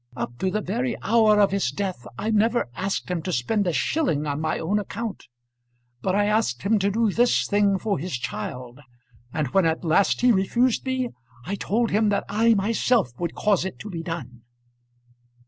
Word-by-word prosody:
Up 120 - -4
to 190 - 0
the 215 +3 -1
very 235 +5 -2
hour 220 -2 +4
of 200 -2 +4
his 195 -10 0
death 175 - -4
I 220 - -2
never 225 +3 +2
asked 190 +4 -3
him 175 -2 -1
to 185 - -4
spend 185 - 0
a - - +2
shilling 155 - 0
on 145 0 -2
my 160 - -1
own 195 +6 0
account. 215 +1 -5 0.8
But 190 0 0
I 205 0 +3
asked 210 - 0
him 210 +2 +2
to 200 +1 +1
do 220 +1 +1
this 240 +4 +2
thing 205 -1 +2
for 205 -2 -1
his 180 +4 -5
child; 125 +2 -6 0.5
and 150 -2 -2
when 185 +4 +3
at 160 +2 -1
last 170 +5 +2
he 250 0 +5
refused 235 +6 +1
me, 260 -1 -1 0.4
I 190 - -3
told 225 +3 0
him 215 +1 +3
that 200 - 0
I 225 +3 +3
myself 220 - +1
would 170 -2 -3
cause 205 -4 +2
it 190 -1 -5
to 210 - -8
be 165 -2 -4
done." 140 -8 -6
200 Hz, 195 wpm, -24 LUFS, 165-220 Hz, 0.8 s, he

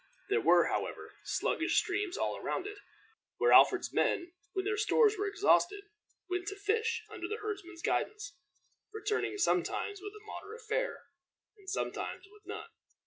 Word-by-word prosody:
There 435 +2 +3
were, - - +6
however, - - -3
sluggish - - 0
streams 400 0 0
all - - 0
around - - -3
it, 410 0 -7 0.6
where 470 - +3
Alfred's - - +6
men, 345 0 +1 0.2
when 380 -1 -1
their 425 +1 +1
stores 435 0 +4
were 410 0 -1
exhausted, 400 -1 +3 0.4
went 360 -1 -2
to 400 - -3
fish, 440 +3 0
under 360 -5 -5
the 430 - -3
herdsman's 395 -5 -6
guidance, 415 -10 -1 0.6
returning 425 -1 -1
sometimes 405 0 0
with 410 +1 -7
a 425 - -21
moderate 435 +2 -8
fare, - - -1 0.5
and 395 -3 -11
sometimes 390 -1 -3
with 425 0 -18
none. 415 - -6
410 Hz, 150 wpm, -32 LUFS, 390-430 Hz, 0.6 s, were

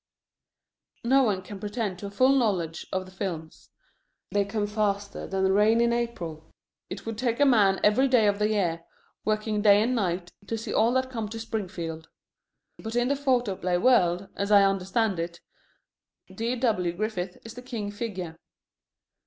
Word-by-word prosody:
No 265 +3 +4
one 205 -7 +1
can 195 +2 -9
pretend 205 -2 -3
to 200 - -5
a - - -6
full 255 +7 +3
knowledge 180 -10 0
of 185 0 -2
the 185 - -13
films. 170 -5 -6 0.6
They 205 -1 +2
come 205 +1 -2
faster 205 -1 -2
than 190 0 +1
rain 210 +3 +4
in 235 0 +3
April. 170 -10 -4 0.4
It - - -7
would 225 -1 -5
take 235 -1 0
a 285 - +6
man 205 -7 +4
every 215 +6 +4
day 245 -4 +4
of 205 0 +2
the 210 0 +2
year, 175 -6 0 0.4
working 215 0 0
day 205 -1 +6
and 245 +3 0
night, 180 -6 -1 0.2
to 225 - -2
see 225 - -5
all 225 +2 +3
that 260 0 0
come 225 -4 -4
to 225 +1 -6
Springfield. 175 -8 -5 0.7
But 220 +1 -6
in 240 +1 +2
the 280 - +2
photoplay 240 -10 0
world, 185 -5 +3
as 200 0 -2
I 205 -1 +7
understand 195 +1 +1
it, 170 +1 -4 0.9
D.W. 225 -7 0
Griffith 185 -2 -3
is 225 - -8
the 250 - -9
king 230 -5 -5
figure. 190 -6 -5
210 Hz, 170 wpm, -27 LUFS, 185-230 Hz, 0.9 s, I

